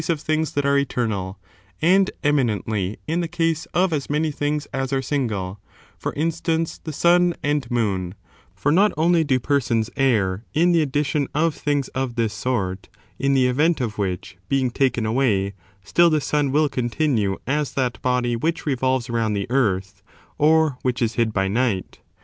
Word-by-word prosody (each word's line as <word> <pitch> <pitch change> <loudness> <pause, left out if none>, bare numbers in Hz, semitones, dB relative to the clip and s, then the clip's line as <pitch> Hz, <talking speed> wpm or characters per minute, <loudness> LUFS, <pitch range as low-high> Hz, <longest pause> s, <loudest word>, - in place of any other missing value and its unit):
^'^ 155 - -7
of 165 -3 +1
things 155 +1 -1
that 145 -1 0
are 140 0 +3
eternal, 105 -8 -2 0.4
and 190 +4 +4
eminently 110 -8 0
in 165 +3 -1
the 170 - -2
case 165 -2 -1
of 180 -1 +1
as 145 -3 -2
many 150 +1 0
things 145 +1 -2
as 135 0 -2
are 135 - +1
single; 110 -9 -2 0.4
for - - -4
instance, 165 +1 -1
the - - -8
sun^ 175 +3 +3
and 145 -4 0
moon: 100 -7 -1 0.4
for 145 - 0
not 200 +6 +4
only 165 +1 +3
do 135 -4 +1
persons 120 -4 0
err 105 -7 +1
in 170 +3 +4
the 170 -2 +4
addition 145 0 0
of 160 +1 +2
things 145 -3 -1
of 130 -2 -3
this 115 -3 0
sort, 100 -5 -2 0.3
in 140 0 +2
the 130 -1 +4
event 150 +7 +2
of 110 -4 -3
which 90 -2 -3
being 130 -2 +1
taken 125 -3 +1
away 110 -5 +1 0.3
still 170 +11 +4
the 155 -1 +2
sun 145 -1 0
will 150 +2 +3
continue 120 -6 0
as 145 +2 -1
that 125 -5 -1
body 125 -1 +1
which 160 +8 -2
revolves 130 -3 0
round 115 -3 0
the 100 - -2
earth, 100 -6 0 0.4
or 155 -3 +3
which 125 -1 -1
is 115 -2 0
hid 115 -2 +1
by 95 -2 0
night. 105 -2 -1
135 Hz, 175 wpm, -22 LUFS, 115-155 Hz, 0.4 s, and